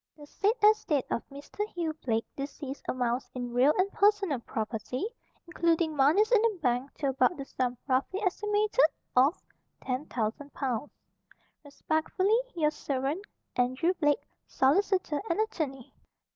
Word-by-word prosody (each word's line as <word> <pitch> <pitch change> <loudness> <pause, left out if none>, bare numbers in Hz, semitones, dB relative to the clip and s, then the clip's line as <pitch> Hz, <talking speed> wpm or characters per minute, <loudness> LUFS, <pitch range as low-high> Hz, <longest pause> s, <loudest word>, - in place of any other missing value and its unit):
"The 295 - -11
said 400 +8 +1
estate 380 - +4
of - - 0
Mr. 285 +8 -5
Hugh 340 -6 -3
Blake, 225 -2 0
deceased, 275 0 -6
amounts, 245 0 -1
in 245 -1 -4
real 255 +4 +5
and 380 +2 +2
personal 400 - +2
property, 225 - -3 0.4
including 335 -2 +1
moneys 315 - +4
in 460 -4 +6
the 450 -3 +1
bank, 255 -1 0
to 280 - -1
about 265 +5 +2
the 275 - -5
sum, 250 -2 -2
roughly 270 +8 0
estimated, 420 +4 +2 0.3
of 270 +7 +4 0.4
10,000 255 0 -3
pounds. 265 0 -2 0.7
"Respectfully, 315 +8 0 0.2
your 305 -3 +2
servant, 280 +5 -2 0.3
"Andrew 255 +8 +1
Blake, 295 -5 +1 0.2
Solicitor 320 +2 +2
and 335 - +1
Att'y." 305 - -2
290 Hz, 130 wpm, -29 LUFS, 255-370 Hz, 0.7 s, in